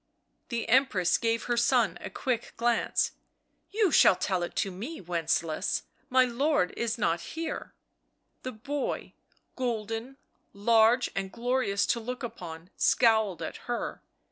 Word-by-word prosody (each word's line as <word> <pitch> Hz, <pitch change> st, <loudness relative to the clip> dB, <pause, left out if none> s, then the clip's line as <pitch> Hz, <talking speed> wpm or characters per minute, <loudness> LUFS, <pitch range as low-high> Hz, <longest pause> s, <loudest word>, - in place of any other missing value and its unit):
The 235 Hz, -3 st, -2 dB
Empress 230 Hz, -8 st, +3 dB
gave 230 Hz, 0 st, 0 dB
her 240 Hz, -, 0 dB
son 235 Hz, 0 st, +2 dB
a -, -, -5 dB
quick 245 Hz, -4 st, -2 dB
glance. 235 Hz, 0 st, +1 dB, 0.3 s
" -, -, -47 dB
You 415 Hz, -3 st, +2 dB
shall 195 Hz, -, +7 dB
tell 185 Hz, 0 st, -1 dB
it 175 Hz, -, -4 dB
to 195 Hz, -, 0 dB
me, 235 Hz, -, -6 dB
Wencelaus— 165 Hz, -2 st, -1 dB, 0.3 s
my 255 Hz, 0 st, +5 dB
lord 255 Hz, -, +1 dB
is 235 Hz, 0 st, -1 dB
not 170 Hz, -6 st, +1 dB, 0.2 s
here." 330 Hz, 0 st, -4 dB, 0.7 s
The 255 Hz, -, -4 dB
boy, 275 Hz, +6 st, -4 dB, 0.4 s
golden, 230 Hz, +1 st, -3 dB, 0.4 s
large 225 Hz, +4 st, +4 dB
and 195 Hz, -1 st, -3 dB
glorious 240 Hz, -4 st, 0 dB
to 235 Hz, -, +1 dB
look 250 Hz, +3 st, -5 dB
upon, 170 Hz, -6 st, -7 dB
scowled 220 Hz, -7 st, +3 dB
at -, -, -5 dB
her. 240 Hz, -, -3 dB
230 Hz, 140 wpm, -29 LUFS, 195-250 Hz, 0.7 s, shall